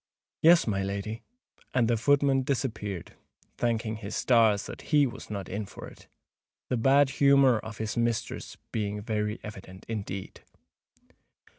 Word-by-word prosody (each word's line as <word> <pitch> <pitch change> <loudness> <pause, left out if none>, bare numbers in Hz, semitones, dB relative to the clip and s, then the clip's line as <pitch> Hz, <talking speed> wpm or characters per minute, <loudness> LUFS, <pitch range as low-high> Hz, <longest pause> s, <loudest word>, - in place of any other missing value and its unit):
"Yes, 170 +1 +6
my 100 -3 0
lady;"—and 110 - -4
the 120 - +2
footman 140 +2 +3
disappeared, 110 -9 -3 0.5
thanking 115 -2 0
his 105 -1 -6
stars 115 -5 +3
that - - -8
he 150 -2 +5
was 120 - -7
not 100 -4 -5
"in 105 +1 -4
for - - -10
it,"—the 125 - -10
bad 135 +3 +4
humour 140 -4 +5
of 110 -1 -8
his 110 -1 -3
mistress 115 -1 -2
being 105 -1 -2
very 105 -1 -2
evident 95 -3 -10
indeed. 100 -4 -5
110 Hz, 130 wpm, -28 LUFS, 105-130 Hz, 0.5 s, Yes